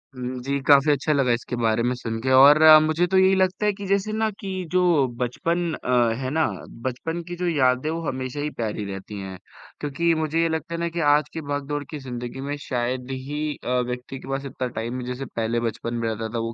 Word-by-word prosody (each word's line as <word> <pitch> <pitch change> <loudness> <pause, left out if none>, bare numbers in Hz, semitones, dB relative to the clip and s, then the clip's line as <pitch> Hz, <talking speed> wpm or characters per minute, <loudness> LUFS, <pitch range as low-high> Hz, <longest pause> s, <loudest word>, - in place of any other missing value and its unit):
हुँ, 125 0 -5
जी, 140 +1 -1
काफ़ी 145 +1 +6
अच्छा 145 +2 +1
लगा 135 -4 +2
इसके 120 +1 -3
बारे 115 -1 +1
में 125 +1 +1
सुन 115 -2 -4
के 130 - -1
और 140 +3 +8 0.3
मुझे 155 +3 +2
तो 190 +1 +2
यही 190 0 +5
लगता 190 +2 +1
है 210 - +3
कि 200 0 -8
जैसे 200 +2 +1
ना 220 0 +1
कि 195 - -6 0.2
जो 185 0 +3 0.4
बचपन 165 +7 -1
अ, 120 -2 +1
है 130 - -2
ना 160 +2 +2 0.4
बचपन 165 +7 -3
की 175 - -5
जो 180 0 -2
यादें 130 -3 +2
हैं, 160 - -2
वो 165 - -4
हमेशा 130 +1 -4
ही 150 +1 -1
प्यारी 110 -2 -3
रहती 95 +2 -7
हैं, 95 -1 -7 0.4
क्योंकि 155 +4 0
मुझे 160 +1 0
ये 165 - +2
लगता 160 +1 -3
है 170 - -4
ना 170 - -1
कि - - +1
आज 150 0 +1
की 160 - -4
भाग-दौड़ 145 0 -3
की 155 - -5
ज़िंदगी 125 -1 -6
में - - -1
शायद 125 +1 -2
ही 135 +3 -4 0.2
अ, 125 +1 +1
व्यक्ति 125 +2 -5
के - - -12
पास 135 +1 -2
इतना 130 -1 -4
टाइम 120 +2 -4
है, - - -6
जैसे 125 +2 -4
पहले 115 -1 -2
बचपन 115 +2 -6
में 115 -1 -1
रहता 110 0 -3
था, 115 - -1
वो 115 0 -3
135 Hz, 235 wpm, -24 LUFS, 120-160 Hz, 0.4 s, और